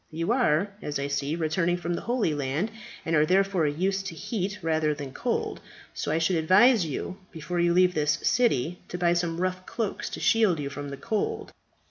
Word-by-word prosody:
You 165 Hz, +5 st, -2 dB
are, 200 Hz, -6 st, +2 dB
as 150 Hz, -, -3 dB
I 140 Hz, -, -2 dB
see, 140 Hz, +2 st, -1 dB
returning 170 Hz, +2 st, 0 dB
from 175 Hz, 0 st, -3 dB
the -, -, -3 dB
Holy 235 Hz, -9 st, 0 dB
Land, 145 Hz, +9 st, -1 dB, 0.3 s
and 165 Hz, -, +1 dB
are 150 Hz, -, +5 dB
therefore 185 Hz, -1 st, +2 dB
used 190 Hz, +6 st, -1 dB
to 165 Hz, -, -6 dB
heat 200 Hz, +2 st, -3 dB
rather 155 Hz, -2 st, +1 dB
than 140 Hz, -3 st, -7 dB
cold, -, -, -2 dB, 0.3 s
so 145 Hz, -, -3 dB
I 155 Hz, -, +2 dB
should 165 Hz, +2 st, +2 dB
advise 190 Hz, +7 st, +5 dB
you 155 Hz, +5 st, -4 dB
before 165 Hz, +2 st, -4 dB
you 170 Hz, 0 st, +3 dB
leave 180 Hz, +1 st, +4 dB
this 150 Hz, -2 st, +2 dB
city 180 Hz, -, +2 dB
to 180 Hz, -, -5 dB
buy 175 Hz, -1 st, +3 dB
some 170 Hz, -1 st, -1 dB
rough 185 Hz, 0 st, -1 dB
cloaks 225 Hz, -4 st, -3 dB
to -, -, -6 dB
shield 215 Hz, -8 st, +3 dB
you 140 Hz, -1 st, -4 dB
from 145 Hz, 0 st, -6 dB
the 140 Hz, -, -6 dB
cold. 220 Hz, +2 st, -2 dB
170 Hz, 200 wpm, -27 LUFS, 150-195 Hz, 0.3 s, are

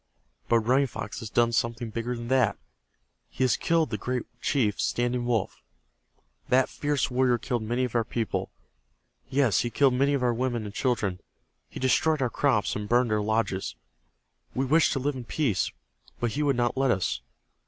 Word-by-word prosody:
But 115 Hz, -1 st, +4 dB
Running 130 Hz, +5 st, +3 dB
Fox 110 Hz, -3 st, -6 dB
has 115 Hz, -3 st, -6 dB
done 120 Hz, +1 st, +2 dB
something 115 Hz, 0 st, -1 dB
bigger 115 Hz, +2 st, -3 dB
than 120 Hz, 0 st, -6 dB
that. 125 Hz, -6 st, +3 dB, 0.7 s
He 130 Hz, -, -2 dB
has 125 Hz, -3 st, +3 dB
killed 165 Hz, -3 st, +1 dB
the 105 Hz, -, -2 dB
great 125 Hz, +1 st, -2 dB, 0.2 s
chief 110 Hz, -8 st, +1 dB
Standing 120 Hz, 0 st, 0 dB
Wolf. 115 Hz, -5 st, -1 dB, 0.9 s
That 130 Hz, +1 st, +4 dB
fierce 145 Hz, -2 st, -1 dB
warrior 125 Hz, -1 st, +3 dB
killed 120 Hz, 0 st, -2 dB
many 120 Hz, +4 st, -1 dB
of 125 Hz, -, -2 dB
our 115 Hz, -1 st, +2 dB
people. 115 Hz, 0 st, -2 dB, 0.8 s
Yes, 130 Hz, -5 st, +3 dB
he 120 Hz, -, 0 dB
killed 135 Hz, +3 st, +3 dB
many 140 Hz, +3 st, +2 dB
of 130 Hz, -, -1 dB
our 120 Hz, -1 st, +2 dB
women 120 Hz, -2 st, -1 dB
and 100 Hz, -, -7 dB
children. 110 Hz, -7 st, 0 dB, 0.5 s
He -, -, -8 dB
destroyed 155 Hz, +4 st, +2 dB
our 125 Hz, -3 st, 0 dB
crops, 130 Hz, -8 st, +1 dB
and 105 Hz, 0 st, -4 dB
burned 120 Hz, -1 st, +3 dB
our 105 Hz, -1 st, +2 dB
lodges. 105 Hz, -3 st, -1 dB, 0.8 s
We 135 Hz, -, +1 dB
wished 155 Hz, +4 st, +4 dB
to 135 Hz, -, -1 dB
live 145 Hz, +3 st, 0 dB
in 125 Hz, -2 st, -7 dB
peace, 120 Hz, -8 st, 0 dB, 0.5 s
but 120 Hz, -2 st, 0 dB
he 145 Hz, -, -2 dB
would 140 Hz, -2 st, +2 dB
not 120 Hz, 0 st, 0 dB
let 135 Hz, 0 st, +2 dB
us. 95 Hz, -6 st, 0 dB
120 Hz, 185 wpm, -27 LUFS, 115-130 Hz, 0.9 s, But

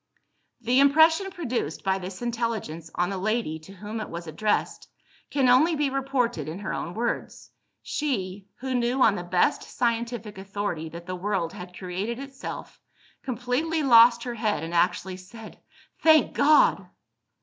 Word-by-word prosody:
The 245 Hz, +3 st, +3 dB
impression 320 Hz, +6 st, +5 dB
produced 255 Hz, -, -3 dB
by 190 Hz, 0 st, +1 dB
this 185 Hz, +4 st, -7 dB
intelligence 225 Hz, -9 st, -3 dB
on 175 Hz, +2 st, 0 dB
the 195 Hz, -, -3 dB
lady 215 Hz, -5 st, -1 dB
to 155 Hz, +5 st, -14 dB
whom 210 Hz, +3 st, -6 dB
it -, -, -6 dB
was 170 Hz, 0 st, -6 dB
addressed, 205 Hz, +7 st, -1 dB, 0.4 s
can 275 Hz, -3 st, +2 dB
only 290 Hz, +7 st, +5 dB
be 290 Hz, -2 st, 0 dB
reported 255 Hz, -, -1 dB
in 160 Hz, -, -5 dB
her 200 Hz, 0 st, -4 dB
own 170 Hz, -, -4 dB
words. 235 Hz, +2 st, -3 dB, 0.3 s
She 200 Hz, -9 st, -3 dB
who 260 Hz, 0 st, -4 dB
knew, 245 Hz, +1 st, +2 dB
on 220 Hz, -, +5 dB
the -, -, -4 dB
best 175 Hz, 0 st, +2 dB
scientific 230 Hz, -3 st, -2 dB
authority, 195 Hz, -5 st, -4 dB
that 170 Hz, +1 st, -9 dB
the 185 Hz, 0 st, -4 dB
world 180 Hz, -3 st, -2 dB
had 180 Hz, 0 st, -9 dB
created 190 Hz, +5 st, -4 dB
itself 270 Hz, 0 st, -8 dB, 0.4 s
completely 260 Hz, +6 st, -1 dB
lost 235 Hz, -2 st, +7 dB
her 245 Hz, -, -4 dB
head, 215 Hz, -9 st, -1 dB
and 165 Hz, +1 st, -5 dB
actually 180 Hz, +2 st, +1 dB
said, 210 Hz, +4 st, -12 dB, 0.4 s
"Thank 315 Hz, -2 st, +5 dB
God!" 285 Hz, -10 st, +4 dB
225 Hz, 155 wpm, -26 LUFS, 185-255 Hz, 0.4 s, lost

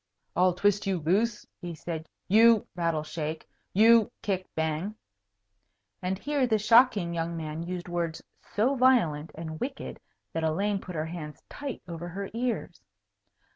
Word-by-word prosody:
"I'll 180 Hz, 0 st, +4 dB
twist 205 Hz, +2 st, +2 dB
you 190 Hz, -2 st, +1 dB
loose," 205 Hz, +8 st, +1 dB, 0.2 s
he 175 Hz, -2 st, -5 dB
said, 160 Hz, -1 st, -6 dB, 0.2 s
"you 225 Hz, +2 st, +6 dB
(rattle, 165 Hz, -3 st, 0 dB
shake) 155 Hz, 0 st, -4 dB, 0.2 s
you 225 Hz, +2 st, +6 dB
(kick, 190 Hz, -2 st, -1 dB
bang) 160 Hz, +6 st, -1 dB, 0.6 s
" 100 Hz, 0 st, -50 dB
And 185 Hz, +1 st, -1 dB
here 285 Hz, +3 st, 0 dB
the 220 Hz, -2 st, +3 dB
shocking 215 Hz, -4 st, +5 dB
young 165 Hz, 0 st, -2 dB
man 155 Hz, 0 st, -4 dB
used 175 Hz, +1 st, -5 dB
words 170 Hz, -2 st, -2 dB, 0.4 s
so 235 Hz, +7 st, +3 dB
violent 230 Hz, -, +3 dB
and 160 Hz, -1 st, -6 dB
wicked 270 Hz, +1 st, -5 dB, 0.3 s
that 165 Hz, -, -1 dB
Elaine 195 Hz, +6 st, +1 dB
put 180 Hz, -, -8 dB
her 155 Hz, 0 st, -1 dB
hands 160 Hz, -2 st, -7 dB
tight 280 Hz, -4 st, -6 dB
over 170 Hz, 0 st, -6 dB
her 195 Hz, +3 st, -5 dB
ears. 230 Hz, -7 st, -2 dB
180 Hz, 150 wpm, -28 LUFS, 160-215 Hz, 0.6 s, you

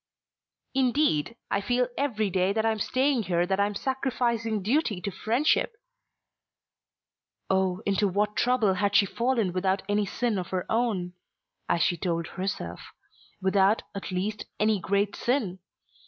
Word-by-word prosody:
"Indeed, 255 Hz, -, +2 dB, 0.2 s
I 200 Hz, -, +1 dB
feel 245 Hz, +4 st, +1 dB
every 220 Hz, -8 st, 0 dB
day 185 Hz, +2 st, +2 dB
that 220 Hz, +1 st, 0 dB
I 225 Hz, -, +3 dB
am 220 Hz, -, -3 dB
staying 260 Hz, +3 st, +1 dB
here 175 Hz, -3 st, +1 dB
that 190 Hz, +2 st, -1 dB
I 200 Hz, -, +4 dB
am 205 Hz, -, -5 dB
sacrificing 235 Hz, -4 st, -1 dB
duty 230 Hz, -, +1 dB
to 200 Hz, -, -4 dB
friendship." 250 Hz, -, +1 dB, 1.8 s
Oh, 190 Hz, +1 st, +1 dB
into 200 Hz, +1 st, +2 dB
what 210 Hz, +2 st, 0 dB
trouble 240 Hz, -5 st, +3 dB
had 200 Hz, +2 st, 0 dB
she 200 Hz, -, +6 dB
fallen 230 Hz, -4 st, 0 dB
without 190 Hz, +1 st, 0 dB
any 205 Hz, 0 st, +1 dB
sin 230 Hz, -1 st, -1 dB
of 180 Hz, -, -4 dB
her 185 Hz, -1 st, -2 dB
own, 215 Hz, -6 st, 0 dB, 0.6 s
as 170 Hz, -1 st, +3 dB
she 175 Hz, -4 st, +1 dB
told 170 Hz, -3 st, -1 dB
herself; 185 Hz, -, -4 dB, 0.6 s
without, 195 Hz, +2 st, +3 dB
at 200 Hz, -, -6 dB
least, 195 Hz, +3 st, -2 dB
any 215 Hz, -1 st, +3 dB
great 200 Hz, +3 st, 0 dB
sin! 230 Hz, -8 st, -1 dB
205 Hz, 150 wpm, -27 LUFS, 190-235 Hz, 1.8 s, she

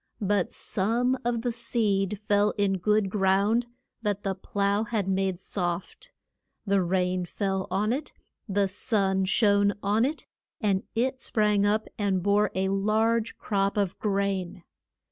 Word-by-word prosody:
But 200 Hz, -2 st, +1 dB
some 235 Hz, +6 st, 0 dB
of 235 Hz, -1 st, -1 dB
the 245 Hz, -, 0 dB
seed 210 Hz, -4 st, 0 dB
fell 205 Hz, 0 st, +3 dB
in 195 Hz, -2 st, +1 dB
good 210 Hz, +2 st, +2 dB
ground, 200 Hz, +4 st, +2 dB, 0.3 s
that 205 Hz, -2 st, -2 dB
the 195 Hz, -, 0 dB
plough 200 Hz, +2 st, -1 dB
had 210 Hz, -3 st, -2 dB
made 190 Hz, -2 st, 0 dB
soft. 180 Hz, -, -4 dB, 0.6 s
The 200 Hz, -1 st, +2 dB
rain 180 Hz, 0 st, 0 dB
fell 190 Hz, +1 st, -2 dB
on 205 Hz, +5 st, +1 dB
it, 285 Hz, +3 st, -4 dB, 0.4 s
the 200 Hz, 0 st, +2 dB
sun 190 Hz, -1 st, 0 dB
shone 205 Hz, 0 st, +3 dB
on 210 Hz, +3 st, +2 dB
it, 295 Hz, +5 st, -2 dB, 0.3 s
and 200 Hz, -4 st, +1 dB
it 255 Hz, +3 st, 0 dB
sprang 210 Hz, -2 st, +2 dB
up 215 Hz, +1 st, +1 dB
and 195 Hz, -3 st, 0 dB
bore 205 Hz, +1 st, +3 dB
a 190 Hz, 0 st, 0 dB
large 215 Hz, +3 st, +1 dB
crop 200 Hz, 0 st, -1 dB
of 200 Hz, -3 st, 0 dB
grain. 195 Hz, -3 st, -1 dB
200 Hz, 145 wpm, -27 LUFS, 190-215 Hz, 0.6 s, fell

